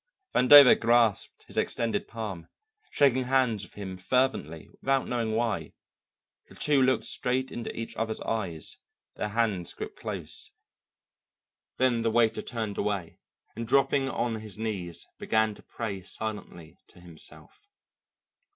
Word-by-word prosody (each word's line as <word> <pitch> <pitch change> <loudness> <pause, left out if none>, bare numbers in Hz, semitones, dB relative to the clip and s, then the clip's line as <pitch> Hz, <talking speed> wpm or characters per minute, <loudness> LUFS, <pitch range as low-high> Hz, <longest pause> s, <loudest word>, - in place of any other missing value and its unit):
Vandover 135 +1 +9
grasped 115 -3 +2
his - - -3
extended 115 -1 -1
palm, 105 -7 -6 0.4
shaking 130 -3 +3
hands 125 -5 +2
with 90 - -12
him 95 -2 -6
fervently, 95 - 0
without 135 0 +1
knowing 115 -3 -1
why. 115 -2 -1 0.7
The - - -16
two 145 -2 +2
looked 130 -2 +3
straight 130 +1 -1
into 120 - -5
each 115 - -6
other's 110 0 -2
eyes, 90 -9 -1 0.4
their - - -2
hands 105 -5 -1
gripped - - -8
close; - - -3 1.3
then 125 -3 +2
the 115 - +1
waiter 115 0 +2
turned 110 -4 -4
away, 100 -5 -2 0.4
and 115 +1 -5
dropping 135 +1 +3
on 120 -3 -2
his 110 -3 -6
knees 100 -6 -3
began 110 -1 +1
to - - -15
pray 100 -5 -5
silently 100 -4 -6
to 90 - -18
himself. 85 - -10
115 Hz, 135 wpm, -28 LUFS, 100-125 Hz, 1.3 s, Vandover